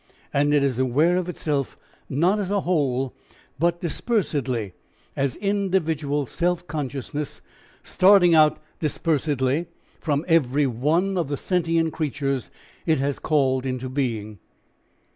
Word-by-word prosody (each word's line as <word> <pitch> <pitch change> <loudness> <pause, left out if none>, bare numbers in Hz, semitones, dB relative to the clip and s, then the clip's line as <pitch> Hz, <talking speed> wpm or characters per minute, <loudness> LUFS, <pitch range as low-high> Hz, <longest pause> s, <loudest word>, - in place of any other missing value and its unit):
And 145 +1 +2
it 145 -1 +3
is 130 -3 0
aware 145 +7 +3
of 180 -1 -2
itself 145 -6 -2 0.3
not 175 +10 +2
as 195 -3 -2
a 200 -1 +1
whole, 135 -7 0 0.5
but 170 +1 +1
dispersedly 140 - -1 0.4
as 140 -1 0
individual 165 -8 0
self 175 +5 -1
consciousness, 145 -2 -4 0.4
starting 185 -2 +5
out 155 -1 +5 0.2
dispersedly 150 -1 0 0.3
from 150 +1 -1
every 150 -4 +3
one 160 +10 +1
of 165 - -1
the 145 0 -2
sentient 165 -2 0
creatures 140 -4 -2 0.4
it 160 -1 +3
has 140 +1 -1
called 135 -4 +1
into 130 0 -3
being. 115 -7 -3
150 Hz, 125 wpm, -24 LUFS, 135-170 Hz, 0.5 s, starting